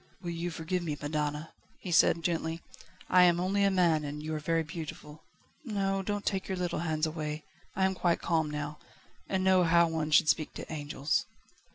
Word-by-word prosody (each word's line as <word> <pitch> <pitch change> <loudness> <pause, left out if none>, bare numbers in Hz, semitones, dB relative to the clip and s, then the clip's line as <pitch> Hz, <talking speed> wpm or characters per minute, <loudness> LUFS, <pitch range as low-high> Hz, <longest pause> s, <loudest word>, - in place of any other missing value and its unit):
"Will 175 -2 -5
you 170 +1 -3
forgive 170 +2 -2
me, 155 -4 -3
madonna?" 150 +1 -2 0.3
he 180 - -6
said 165 0 +4
gently. 165 -1 -2 0.4
"I 180 - +5
am 175 -1 +5
only 195 +3 +1
a 200 - +5
man 170 -5 +3
and 150 +1 -5
you 155 +1 -3
are 155 - -2
very 165 +2 0
beautiful. 155 -1 -8 0.4
No 195 -5 -1
don't 205 +1 -3
take 190 -2 -1
your 190 - -2
little 180 -3 -2
hands 155 -1 0
away. 155 -1 -4 0.3
I 190 - +2
am 190 - +1
quite 175 -2 +1
calm 160 -2 0
now, 150 0 -5 0.5
and 190 -1 0
know 190 -1 +5
how 170 0 +5
one 160 -2 -2
should 150 0 +5
speak 155 0 +1
to - - -6
angels." 145 -1 -1
165 Hz, 195 wpm, -30 LUFS, 155-180 Hz, 0.5 s, I